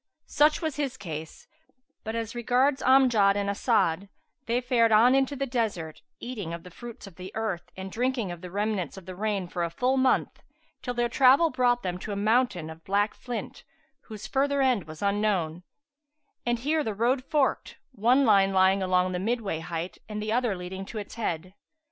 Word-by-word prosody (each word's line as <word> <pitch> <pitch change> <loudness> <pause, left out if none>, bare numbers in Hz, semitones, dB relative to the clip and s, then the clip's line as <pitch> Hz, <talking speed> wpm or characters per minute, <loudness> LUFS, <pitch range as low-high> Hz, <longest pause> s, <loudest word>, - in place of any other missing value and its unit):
Such 300 +2 +3
was 315 -3 -2
his 280 -3 -2
case; 160 -3 -8 0.6
but 220 +1 -4
as 230 -1 -3
regards 255 +3 +1
Amjad 245 -7 +5
and 200 0 -1
As'ad 200 -4 +1 0.4
they 235 +1 +1
fared 240 -2 +2
on 230 +4 +6
into 270 +1 +2
the 275 0 -2
desert 215 -11 -3 0.2
eating 205 -10 -5
of 170 - -11
the 180 - -12
fruits 235 +5 -10
of 195 -5 -14
the 185 +1 -8
earth 215 -6 -3
and 190 0 -6
drinking 245 -4 -1
of 175 -1 -8
the 180 - -8
remnants 200 -3 -2
of 190 - -10
the 185 - -8
rain 200 -2 -2
for 175 0 -3
a 170 - -1
full 250 +9 0
month, 260 0 +1 0.4
till 250 -1 -4
their 240 0 +1
travel 270 +7 +5
brought 245 -1 +2
them 180 -1 -3
to 210 - -6
a - - -2
mountain 205 -6 +1
of 160 +1 -13
black 205 +2 +1
flint[FN#377] 245 -2 -6 0.5
whose 215 -2 -8
further 280 +4 +1
end 255 -8 +2
was 155 +3 -9
unknown; 200 -5 0 0.9
and 240 0 +2
here 305 +3 +1
the 220 -6 -3
road 250 +5 +1
forked, 285 -1 0
one 250 +4 +3
line 195 -3 +5
lying 190 +1 +4
along 185 0 +2
the 180 - -2
midway 210 -4 -1
height 165 +1 -5
and 210 0 -4
the 215 +1 -3
other 240 -3 +1
leading 185 +2 -6
to 215 - -8
its 205 -1 -6
head. 185 -5 -3
215 Hz, 190 wpm, -27 LUFS, 185-250 Hz, 0.9 s, on